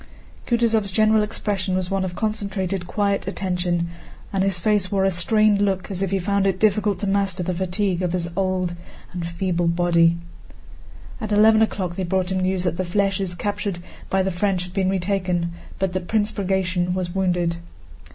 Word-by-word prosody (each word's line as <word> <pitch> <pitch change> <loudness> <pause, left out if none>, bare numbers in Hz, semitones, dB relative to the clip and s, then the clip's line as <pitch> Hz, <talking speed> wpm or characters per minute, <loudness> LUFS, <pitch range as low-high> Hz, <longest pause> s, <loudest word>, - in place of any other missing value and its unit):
Kutúzov's 230 -4 +2
general 215 +2 +4
expression 205 -3 -2
was 185 0 -2
one 195 -1 +1
of 180 -2 -4
concentrated 195 -4 -2
quiet 200 -1 0
attention, 180 -3 -1 0.4
and 190 -1 +2
his 195 -2 +1
face 200 0 +1
wore 195 -1 +2
a 195 - +3
strained 210 +3 +3
look 195 -1 0
as 190 -1 -4
if 195 - 0
he 195 - +1
found 195 +1 +1
it 190 -1 0
difficult 210 -2 +2
to - - -1
master 195 -2 0
the 185 +1 -1
fatigue 185 +1 -1
of 180 -1 -1
his 175 -2 -1
old 185 -2 0 0.4
and 175 -2 -3
feeble 175 0 -1
body. 170 -1 +3 1.0
At 215 -1 -4
eleven 220 +1 +6
o'clock 185 -5 -1
they 190 - -1
brought 185 +1 0
him 190 - 0
news 185 0 0
that 175 -2 -1
the 185 - 0
flèches 195 -1 0
captured 205 -2 -2 0.3
by 190 0 +2
the 190 - 0
French 185 0 0
had 180 0 -10
been 190 -1 +1
retaken, 180 -2 0 0.3
but 190 -2 -1
that 185 -1 -3
Prince 215 -1 +1
Bagratión 185 -3 0
was 180 -2 -3
wounded. 175 -3 0
190 Hz, 180 wpm, -23 LUFS, 180-200 Hz, 1.0 s, eleven